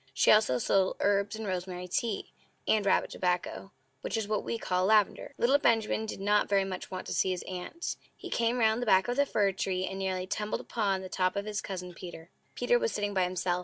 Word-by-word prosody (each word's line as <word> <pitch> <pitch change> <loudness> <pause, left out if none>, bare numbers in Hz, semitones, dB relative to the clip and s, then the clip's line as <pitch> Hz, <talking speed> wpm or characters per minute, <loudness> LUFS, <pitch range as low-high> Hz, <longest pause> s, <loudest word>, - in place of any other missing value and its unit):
She - - +5
also 215 -12 +5
sold 190 +9 +2
herbs, 200 +1 +1
and 220 0 -5
rosemary 180 -1 -4
tea, 210 +3 -2 0.4
and 210 -2 +2
rabbit - - +2
tobacco 180 +2 -2 0.3
(which - - -2
is 220 -2 -2
what 210 -1 -1
we 230 - -2
call 185 -3 0
lavender). 215 -1 +2
Little 270 +4 +4
Benjamin 220 -3 +2
did - - -5
not 205 +1 +2
very 200 -1 +3
much 185 -1 -6
want 185 -1 -5
to - - -4
see - - +2
his 185 -1 -2
Aunt. 185 - -5 0.2
He - - -9
came 235 +1 +1
round 220 0 +3
the 245 - -3
back 190 -2 +5
of 245 - -1
the 285 +1 +2
fir 200 -5 +2
tree, 185 -1 -1
and 190 0 -5
nearly 185 -1 -1
tumbled 210 +2 -2
upon 200 -4 -1
the - - -5
top 185 0 0
of 200 0 -2
his 210 0 -3
Cousin 180 -2 -6
Peter. 175 -1 -10 0.2
Peter 485 0 +2
was 475 -1 0
sitting 205 -1 -2
by 185 -2 +2
himself. 180 0 -1
195 Hz, 225 wpm, -30 LUFS, 185-215 Hz, 0.4 s, She